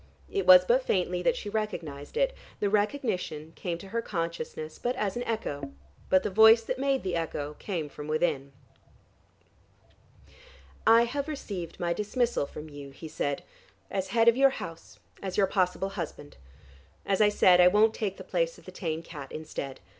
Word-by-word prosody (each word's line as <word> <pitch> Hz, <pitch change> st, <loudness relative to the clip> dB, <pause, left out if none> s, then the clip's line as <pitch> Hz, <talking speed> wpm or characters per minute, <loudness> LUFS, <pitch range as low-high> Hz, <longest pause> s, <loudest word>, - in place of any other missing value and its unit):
It 395 Hz, -, -1 dB
was 180 Hz, 0 st, +9 dB
but 245 Hz, +6 st, +4 dB
faintly 180 Hz, -4 st, 0 dB
that 250 Hz, +5 st, +2 dB
she 220 Hz, -, -6 dB
recognized 170 Hz, -, -4 dB
it; -, -, +2 dB, 0.3 s
the 205 Hz, -, 0 dB
recognition 205 Hz, -, -1 dB
came 175 Hz, -2 st, -3 dB
to 195 Hz, +3 st, -11 dB
her 230 Hz, +3 st, -1 dB
consciousness 165 Hz, -4 st, -4 dB
but 245 Hz, +1 st, -1 dB
as 210 Hz, -6 st, -1 dB
an 240 Hz, -, -2 dB
echo. 145 Hz, -11 st, -3 dB, 0.4 s
But 185 Hz, 0 st, +4 dB
the -, -, -2 dB
voice 220 Hz, +3 st, +7 dB
that 255 Hz, +3 st, -3 dB
made 275 Hz, 0 st, +1 dB
the 185 Hz, -2 st, -1 dB
echo 150 Hz, -3 st, -3 dB
came 170 Hz, -7 st, -3 dB
from 150 Hz, +1 st, -9 dB
within. 155 Hz, -3 st, 0 dB, 2.4 s
"I 230 Hz, +1 st, +7 dB
have 275 Hz, +5 st, -2 dB
received 200 Hz, -, -6 dB
my 170 Hz, -1 st, 0 dB
dismissal 210 Hz, -, 0 dB
from 150 Hz, +2 st, -9 dB
you," 145 Hz, -2 st, -9 dB
he 140 Hz, +4 st, -10 dB
said, 145 Hz, -2 st, -2 dB, 0.5 s
"as 190 Hz, -1 st, -1 dB
head 225 Hz, +3 st, +2 dB
of 235 Hz, -, +7 dB
your 275 Hz, +1 st, +6 dB
house, 165 Hz, -10 st, -8 dB, 0.2 s
as 190 Hz, -2 st, -4 dB
your 200 Hz, -, +5 dB
possible 185 Hz, 0 st, 0 dB
husband. 170 Hz, -6 st, -7 dB, 0.7 s
As 195 Hz, +1 st, +1 dB
I 210 Hz, -, +6 dB
said, 180 Hz, -3 st, +5 dB
I 180 Hz, -, +8 dB
won't 215 Hz, +4 st, +4 dB
take 200 Hz, -4 st, -3 dB
the -, -, -8 dB
place -, -, -1 dB
of -, -, -18 dB
the -, -, -9 dB
tame 165 Hz, -3 st, -3 dB
cat 145 Hz, -5 st, -9 dB
instead. 145 Hz, -3 st, -6 dB
190 Hz, 175 wpm, -28 LUFS, 160-225 Hz, 2.4 s, was